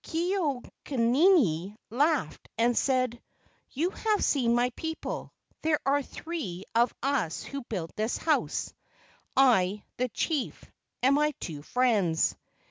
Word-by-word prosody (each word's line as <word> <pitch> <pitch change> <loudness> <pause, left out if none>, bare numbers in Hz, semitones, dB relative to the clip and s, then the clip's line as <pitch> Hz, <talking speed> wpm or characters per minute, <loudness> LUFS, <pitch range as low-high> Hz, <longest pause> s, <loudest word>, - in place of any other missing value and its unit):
Ke 345 +3 -1
au 290 -10 -1 0.3
nini 235 - +3
laughed 285 - 0
and 235 +1 +3
said, 255 -3 +1 0.5
"You 330 +7 -1
have 430 0 0
seen 240 -5 +2
my 245 +1 +2
people: 320 +5 -5 0.3
there 310 -1 +2
are 280 +1 +3
three 275 - -6
of 235 +2 +4
us 265 - 0
who 280 0 -5
built 175 -7 -4
this 215 +2 -1
house—I, 230 - 0
the 250 0 0
chief, 300 +2 -2 0.4
and 265 +2 +5
my 300 0 +2
two 150 -4 -6
friends." 200 -6 +2
255 Hz, 125 wpm, -28 LUFS, 220-300 Hz, 0.5 s, and